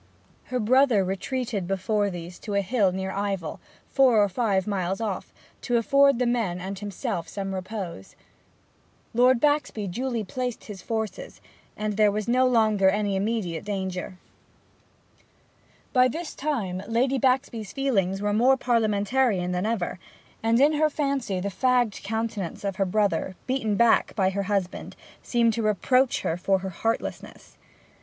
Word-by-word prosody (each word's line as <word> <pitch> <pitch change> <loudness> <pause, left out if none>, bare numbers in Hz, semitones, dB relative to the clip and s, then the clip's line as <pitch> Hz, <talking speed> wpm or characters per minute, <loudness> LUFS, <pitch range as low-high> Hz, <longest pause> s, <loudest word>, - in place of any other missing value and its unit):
Her 255 - -2
brother 245 -2 +4
retreated 200 +1 -3
before 200 +2 0
these 175 -1 -8
to 205 -3 -5
a 200 - +3
hill 200 -1 +2
near 190 +1 -3
Ivell, 195 -5 -3 0.3
four 260 -5 +5
or 205 - +1
five 195 -2 0
miles 190 -2 -2
off, 210 -5 -4 0.3
to 245 -2 +1
afford 275 +4 +4
the 250 - +1
men 225 -7 0
and 190 +1 -5
himself 195 -4 -4
some 195 -1 -4
repose. 185 - -6 1.0
Lord 250 +1 +4
Baxby 290 -7 +1
duly 235 +4 -2
placed 250 +3 -4
his 200 -4 -9
forces, 225 - -4 0.4
and 210 -1 -2
there 210 -1 +5
was 210 +1 -3
no 255 +2 +3
longer 215 -5 +3
any 205 0 0
immediate 190 -5 -2
danger. 190 -2 -4 1.8
By 255 0 +5
this 320 +6 -5
time 220 -11 -2
Lady 255 +4 +1
Baxby's 245 -5 0
feelings 200 -8 0
were 205 0 +1
more 250 +5 +4
Parliamentarian 215 -4 +1
than 180 +3 -1
ever, 190 -5 -2 0.4
and 225 +1 +2
in 290 +3 +5
her 305 +1 +2
fancy 275 -10 -1
the 200 +2 -2
fagged 245 0 +1
countenance 220 -4 -3
of 195 -2 -3
her 195 - +2
brother, 200 -1 0
beaten 255 -5 0
back 235 +1 +3
by 190 -2 +2
her 200 +1 -2
husband, 195 -3 -2 0.3
seemed 235 -2 +2
to 230 - -2
reproach 240 +5 +2
her 165 - -1
for 195 +2 +2
heartlessness. 190 +4 -4
215 Hz, 150 wpm, -25 LUFS, 190-245 Hz, 1.8 s, four